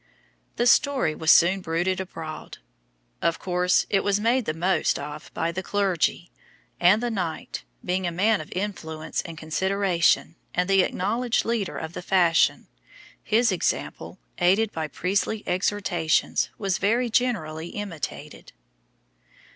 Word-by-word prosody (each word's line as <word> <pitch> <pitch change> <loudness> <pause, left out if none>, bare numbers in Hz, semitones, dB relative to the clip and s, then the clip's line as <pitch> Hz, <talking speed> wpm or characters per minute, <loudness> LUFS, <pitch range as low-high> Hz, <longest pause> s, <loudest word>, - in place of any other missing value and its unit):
The 240 - +1
story 265 - +3
was 160 0 -2
soon 180 +4 +6
bruited 180 +2 -1
abroad; 165 -4 -8 0.6
of 165 0 +1
course 180 0 +1
it 195 - +1
was 200 0 +1
made 235 +3 +1
the 155 - -1
most 180 +4 +1
of 150 +1 -8
by 165 - 0
the 185 +2 -4
clergy, 190 -3 0 0.5
and 195 +6 +4
the 240 - -1
knight, 175 - -4 0.2
being 185 0 0
a - - -1
man 205 +4 +2
of 155 - -11
influence 165 -5 -4
and 165 -2 -9
consideration, 175 +1 +1 0.2
and 180 0 +1
the 195 -1 +5
acknowledged 230 +7 0
leader 225 -5 -1
of 160 +1 -6
the - - -6
fashion, 175 -3 +3 0.6
his 230 +1 +2
example, 185 - -2 0.2
aided 200 +5 +3
by 160 -1 -3
priestly 200 +6 -1
exhortations, 180 -3 0
was 195 -2 -1
very 235 +4 +1
generally 170 -11 0
imitated. 190 -5 -7
185 Hz, 135 wpm, -25 LUFS, 165-205 Hz, 0.6 s, soon